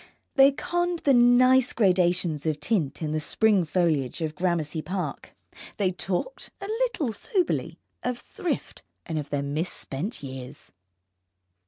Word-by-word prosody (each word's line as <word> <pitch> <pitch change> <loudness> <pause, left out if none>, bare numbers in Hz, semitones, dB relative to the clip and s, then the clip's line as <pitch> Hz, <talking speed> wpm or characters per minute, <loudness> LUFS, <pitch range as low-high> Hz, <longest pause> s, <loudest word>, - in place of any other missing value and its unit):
They 275 -1 +7
conned 350 +4 -1
the 280 - +5
nice 250 +1 +5
gradations 180 -6 +2
of 155 -1 0
tint 170 - -1
in 150 - -1
the 155 - 0
spring 200 +3 +2
foliage 155 -4 0
of 155 -1 -2
Gramercy 160 -2 -1
Park. 185 +2 -5 0.4
They 195 -3 +1
talked, 190 - -3
a - - -6
little 435 - -1
soberly, 360 - -1 0.2
of 250 -1 -2
thrift, 345 - -4 0.2
and 160 -2 -2
of 145 - -6
their 145 -1 -1
misspent 155 - -3
years. 130 +1 -8
180 Hz, 135 wpm, -26 LUFS, 155-250 Hz, 0.4 s, They